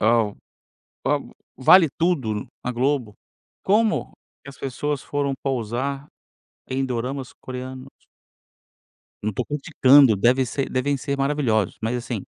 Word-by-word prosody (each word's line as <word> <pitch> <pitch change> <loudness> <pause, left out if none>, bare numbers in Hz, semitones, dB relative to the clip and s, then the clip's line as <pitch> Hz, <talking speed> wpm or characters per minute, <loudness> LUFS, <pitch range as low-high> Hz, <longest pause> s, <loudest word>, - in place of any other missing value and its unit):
ao 110 -2 +2 0.7
para - - +2
o - - -15 0.2
Vale 165 +6 +7
Tudo 135 - 0 0.2
na 125 - -1
Globo, 125 -3 0 0.5
como 215 +3 +2 0.3
que - - -11
as 140 - -15
pessoas 140 +2 -3
foram 140 -1 -1
pousar 135 +3 -2 0.6
em 135 +1 -1
doramas 130 +1 -3
coreanos? 130 +1 -7 1.4
Eu - - -1
não 110 - -1
tô - - -1
criticando, 140 -4 +5
deve 125 +6 +3
ser 135 +3 -3
devem 135 +2 0
ser 140 +1 -3
maravilhosos, 135 -8 +1
mas, 115 +2 -1
assim 120 -4 -4
130 Hz, 130 wpm, -23 LUFS, 120-140 Hz, 1.4 s, Vale